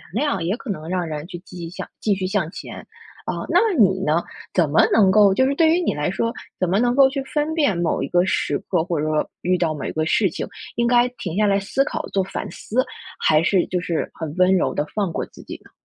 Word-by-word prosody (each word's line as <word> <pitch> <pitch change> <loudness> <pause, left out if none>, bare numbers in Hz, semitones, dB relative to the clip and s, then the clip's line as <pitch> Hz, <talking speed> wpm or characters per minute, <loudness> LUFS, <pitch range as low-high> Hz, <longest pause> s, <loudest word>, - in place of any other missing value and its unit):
谅 290 +5 0
也 175 +5 0
可 260 - -10
能 155 -4 -6
让 180 -1 -1
人 150 -1 -5
去 175 - -7
继 180 0 -12
续 165 - -5
向 175 - -7
继 210 - +1
续 190 -1 -3
向 190 -4 0
前 - - -8 0.5
啊。 - - -3
那 - - +5 0.2
你 190 -3 +4
呢？ 155 +3 +2 0.3
怎 170 -5 +2
么 145 - +5
能 205 -4 +5
够 200 0 +6
就 260 - +3
是 280 - 0
对 320 +2 +4
于 340 +3 +3
你 345 - 0
来 150 0 -1
说， 230 +4 -1 0.3
怎 185 - 0
么 195 +3 +2
能 245 +1 +2
够 270 -1 +6
去 275 0 -3
分 295 +3 -1
辨 285 - +2
某 170 -1 0
一 - - -2
个 175 0 +3
时 - - 0
刻， 175 -4 -1
或 170 -3 -2
者 150 - -1
说 155 -1 0
遇 180 +1 +1
到 165 -2 0
某 150 - -6
一 - - -3
个 155 0 -1
事 195 +4 +2
情， - - -5 0.3
应 235 - +1
该 240 0 +4
停 175 -3 -5
下 210 +1 +3
来 200 0 +3
思 205 +7 0
考 - - -3
做 195 - +2
反 195 - -5
思， 255 +4 -1 0.3
还 155 -1 +4
是 180 +1 +2
就 180 - 0
是 170 -2 -2
很 160 -2 -5
温 185 +1 +4
柔 185 - +1
地 145 - -1
放 200 -5 -1
过 - - -3
自 - - -15
己 - - -8
呢？ - - -19
190 Hz, 280 characters per minute, -22 LUFS, 170-230 Hz, 0.5 s, 够